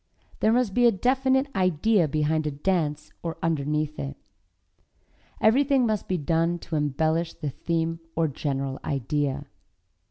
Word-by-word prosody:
There 220 Hz, -, +3 dB
must 240 Hz, -4 st, +2 dB
be 245 Hz, +2 st, +5 dB
a -, -, +6 dB
definite 265 Hz, +5 st, +2 dB
idea 185 Hz, 0 st, +3 dB
behind 155 Hz, +1 st, 0 dB
a -, -, +1 dB
dance 150 Hz, -1 st, -1 dB
or 165 Hz, -1 st, -4 dB
underneath 150 Hz, -1 st, -1 dB
it. 140 Hz, 0 st, -5 dB, 1.2 s
Everything 265 Hz, +3 st, +4 dB
must 215 Hz, -3 st, -1 dB
be 185 Hz, -, 0 dB
done 165 Hz, +3 st, +1 dB
to 165 Hz, -, -6 dB
embellish 160 Hz, +3 st, 0 dB
the 150 Hz, -3 st, -4 dB
theme 165 Hz, +2 st, -2 dB, 0.2 s
or 165 Hz, -1 st, +2 dB
general 135 Hz, -2 st, -3 dB
idea. 140 Hz, +1 st, -1 dB
165 Hz, 135 wpm, -26 LUFS, 150-195 Hz, 1.2 s, a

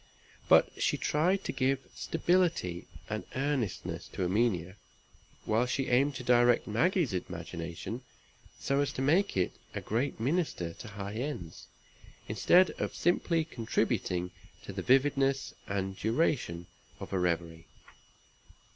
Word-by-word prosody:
But -, -, +7 dB
she -, -, +2 dB
tried 180 Hz, +6 st, +1 dB
to -, -, -2 dB
give 135 Hz, +1 st, +1 dB, 0.2 s
stability 165 Hz, -, 0 dB, 0.2 s
and 110 Hz, -2 st, -3 dB
earnestness 135 Hz, -6 st, -2 dB
to -, -, -4 dB
Erminia; 95 Hz, -1 st, 0 dB, 0.7 s
while 115 Hz, +3 st, +2 dB
she 135 Hz, +1 st, -1 dB
aimed 135 Hz, +3 st, +3 dB
to 125 Hz, -, -5 dB
direct 120 Hz, -1 st, +4 dB
Maggie's 150 Hz, -, +1 dB
imagination, 85 Hz, +4 st, -5 dB, 0.6 s
so 140 Hz, 0 st, 0 dB
as 145 Hz, -, +1 dB
to 130 Hz, -, -2 dB
make 170 Hz, -, +2 dB
it 90 Hz, -, +2 dB, 0.2 s
a -, -, -1 dB
great 120 Hz, +5 st, -1 dB
minister 130 Hz, -, -1 dB
to 115 Hz, -, -10 dB
high 100 Hz, -1 st, -6 dB
ends, 115 Hz, -, -5 dB, 0.6 s
instead 185 Hz, +1 st, +4 dB
of -, -, -2 dB
simply 170 Hz, -2 st, +1 dB
contributing 90 Hz, -, -1 dB, 0.3 s
to -, -, -7 dB
the -, -, -3 dB
vividness 135 Hz, +1 st, +2 dB
and 95 Hz, -1 st, -2 dB
duration 110 Hz, -, 0 dB, 0.3 s
of -, -, -7 dB
a 95 Hz, -, +1 dB
reverie. 85 Hz, -2 st, -1 dB
120 Hz, 130 wpm, -31 LUFS, 95-145 Hz, 0.7 s, But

